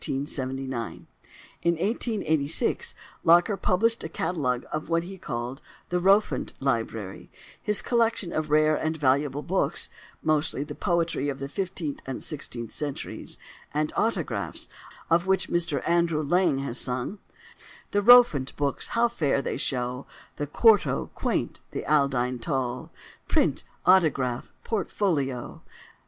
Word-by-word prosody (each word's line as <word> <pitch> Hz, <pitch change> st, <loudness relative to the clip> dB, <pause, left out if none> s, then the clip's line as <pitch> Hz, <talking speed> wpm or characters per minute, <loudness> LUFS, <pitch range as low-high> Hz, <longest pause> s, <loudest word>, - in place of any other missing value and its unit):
In 135 Hz, +1 st, -1 dB
1886 150 Hz, -, -2 dB, 0.3 s
Locker 175 Hz, +5 st, +5 dB
published 225 Hz, +5 st, +1 dB
a 160 Hz, -, -4 dB
catalogue 140 Hz, -8 st, -1 dB
of 155 Hz, +1 st, -3 dB
what 165 Hz, 0 st, +2 dB
he 190 Hz, +2 st, -9 dB
called 120 Hz, +1 st, -4 dB, 0.3 s
the 180 Hz, -, +1 dB
"Rowfant 195 Hz, +4 st, +3 dB
Library"—his 115 Hz, -, -2 dB
collection 230 Hz, -6 st, +1 dB
of 155 Hz, -1 st, -1 dB
rare 155 Hz, +1 st, +4 dB
and 160 Hz, +1 st, -1 dB
valuable 140 Hz, 0 st, +1 dB
books 175 Hz, -3 st, 0 dB, 0.3 s
(mostly 155 Hz, -2 st, +1 dB
the -, -, -7 dB
poetry 170 Hz, -6 st, 0 dB
of 135 Hz, -, -3 dB
the 140 Hz, 0 st, -5 dB
fifteenth 170 Hz, -2 st, -4 dB
and 135 Hz, -, -5 dB
sixteenth 120 Hz, -6 st, -5 dB
centuries) 145 Hz, -2 st, -5 dB, 0.4 s
and 150 Hz, 0 st, 0 dB
autographs—of 175 Hz, -5 st, -2 dB
which 190 Hz, 0 st, +2 dB
Mr 170 Hz, -6 st, 0 dB
Andrew 170 Hz, -2 st, +2 dB
Lang 170 Hz, -1 st, +2 dB
has 135 Hz, -3 st, -1 dB
sung: 125 Hz, +10 st, -2 dB, 0.7 s
"The 205 Hz, -, +2 dB
Rowfant 225 Hz, -, +6 dB
books, 140 Hz, -1 st, -2 dB
how 235 Hz, +1 st, +5 dB
fair 150 Hz, -12 st, 0 dB
they -, -, -3 dB
shew, 125 Hz, 0 st, -2 dB, 0.3 s
The 145 Hz, -, -2 dB
Quarto 215 Hz, +7 st, +3 dB
quaint, -, -, -2 dB
the -, -, -5 dB
Aldine 130 Hz, -4 st, +2 dB
tall, 130 Hz, -2 st, -2 dB, 0.4 s
Print, -, -, +2 dB, 0.2 s
autograph, 140 Hz, -9 st, +3 dB
portfolio! 155 Hz, -, -1 dB
155 Hz, 120 wpm, -26 LUFS, 135-180 Hz, 0.7 s, Rowfant